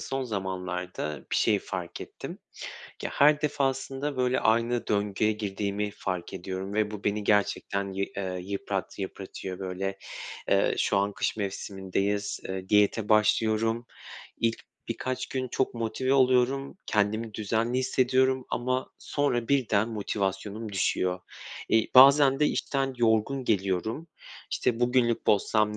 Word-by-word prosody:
son 135 0 -3
zamanlarda 90 - -4
bir - - +1
şey 105 -2 +3
fark 90 -3 -6
ettim. - - -8 0.7
Ya, - - -1
her 150 +1 +5
defasında 135 -1 -1
böyle 125 0 +2
aynı 115 +2 +1
döngüye 105 +1 +1
girdiğimi 105 -1 -2
fark 90 -3 -4
ediyorum 95 +1 -5
ve 105 0 +1
bu, 105 -1 -7
beni 105 0 0
gerçekten 100 -1 +1
yı 100 +1 -1
eee, 95 -2 -3
yıprat 100 0 -4
yıpratıyor 95 -1 -6
böyle. 95 +1 -3 0.5
Eee, - - +3
şu - - +2
an 100 +1 +1
kış - - -1
mevsimindeyiz, 100 0 -2
eee, 95 0 -5
diyete 105 +1 +3
başlıyorum. 110 +2 +2 0.5
İlk 115 -1 +1 0.3
birkaç 130 0 -3
gün 130 -1 -3
çok 130 +1 -1
motive 115 +3 -1
oluyorum. 135 +3 +3
Kendimi 105 +1 0
düzenli 115 +4 0
hissediyorum 130 0 +2
ama 130 +1 -1
sonra 125 -5 -1
birden 115 -6 +2
motivasyonum 105 0 -3
düşüyor. 90 -1 0 0.5
İii, 110 -1 +2
bazen 135 +1 +8
de 150 - +5
işten 135 -2 -1
yorgun 120 +3 +2
geliyorum. 105 - 0 0.4
İşte, 120 -1 0
"Bugünlük 120 -1 +2
bozsam 105 +1 +2
110 Hz, 130 wpm, -28 LUFS, 100-125 Hz, 0.7 s, bazen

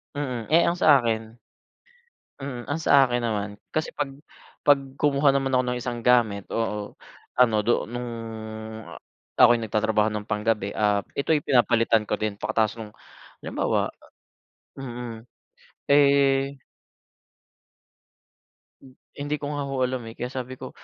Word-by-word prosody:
Mm, 125 -6 -3
eh, 170 +2 +6
ang 170 +1 +1
sa'kin 115 -7 +3 1.0
mm, 135 -3 -6
ang 145 - 0
sa'kin 135 -6 +4
naman, 105 -3 -1 0.2
kasi 155 - -1
pag 140 -2 -4 0.5
pag 145 -1 +5 0.2
kumuha 140 -1 +3
naman 135 -1 0
ako 130 -1 +3
ng 125 0 -1
isang 120 0 -4
gamit, 110 -5 +3
oo, 105 -2 -3 0.4
ano 125 -3 +4
do 120 - +1
nung 120 0 -4 0.8
a 85 - -11 0.4
ako'y 120 0 +8
nagtatrabaho 110 -1 +1
ng 105 0 -5
panggabi, 105 -1 0
ah, 105 -1 +2 0.2
ito'y 150 +2 +1
pinapalitan 115 -4 +3
ko 105 - -2
din 105 -2 -2
pagkatapos 110 +1 0
nung 105 -2 -8 0.5
halimbawa - - -1 0.9
ah, 135 - -7
mm, 120 -2 -6 0.7
eh 140 -1 +3 2.2
Hmm, 130 -1 -16 0.2
hindi 145 +1 -3
ko 145 - -3
nga 145 -1 -3
ho 135 -1 -3
alam, 125 -2 -1
eh, 115 - -8
kaya 125 +1 -5
sabi 130 -1 -5
ko, 130 0 -8
125 Hz, 135 wpm, -25 LUFS, 110-140 Hz, 2.2 s, ako'y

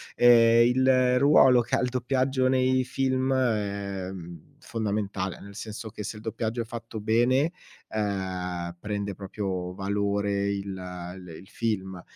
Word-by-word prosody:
Ehm, 115 -1 +6
il 130 0 +3
ruolo 130 -3 +6
che 115 - -1
ha - - +1
il 125 - 0
doppiaggio 130 +1 +1
nei 130 0 +2
film 130 0 0
è, 100 -6 -1
mhmm, 85 -4 -11
fondamentale, 100 -4 -3
nel 100 0 -11
senso 110 +1 -7
che 105 - -7
se 105 - -5
il 105 - -11
doppiaggio 115 +1 -2
è - - -4
fatto 115 -1 -7
bene, 120 +8 +2 0.4
ehm, 90 -4 -3
prende 100 0 -3
proprio 95 -2 -4
valore 100 0 0
il 100 -1 -3
l 90 0 -8
il 95 - -15
film. 95 -5 -3
105 Hz, 145 wpm, -27 LUFS, 95-125 Hz, 0.4 s, Ehm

